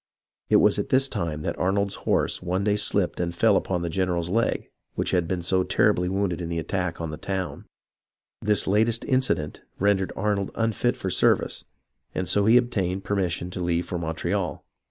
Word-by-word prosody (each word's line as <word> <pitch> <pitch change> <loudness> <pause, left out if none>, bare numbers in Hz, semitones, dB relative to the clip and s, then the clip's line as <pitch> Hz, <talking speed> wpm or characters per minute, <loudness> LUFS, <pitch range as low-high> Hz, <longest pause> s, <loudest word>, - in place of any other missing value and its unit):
It - - +4
was - - +5
at - - -3
this 135 +1 +4
time 85 - -3
that - - -3
Arnold's 100 +2 +1 0.2
horse - - +1
one 90 +2 -1
day 105 0 +2
slipped 100 -3 0
and 85 0 -2
fell 105 +3 +4
upon 90 -2 0
the - - -1
general's 90 -1 -1
leg 115 +3 0 0.2
which - - -1
had 90 -2 +1
been 90 0 -2
so 95 +2 +2
terribly 90 -2 +2
wounded 95 -3 -1
in 85 - -4
the 85 - -2
attack 90 +1 -2
on 80 -2 -4
the 75 - -6
town. 95 +2 -4 0.8
This 105 -1 +2
latest 110 +4 +2
accident 130 - 0 0.2
rendered 95 -1 +1
Arnold 100 -1 0
unfit 115 +2 0
for 95 - -3
service, - - +2 0.5
and 95 - -1
so 100 +4 +3
he 115 +2 +7
obtained 95 -6 0
permission 90 -3 -1
to 90 - -5
leave 85 0 0
for 90 - -4
Montreal. 85 +4 -2
95 Hz, 185 wpm, -25 LUFS, 85-105 Hz, 0.8 s, he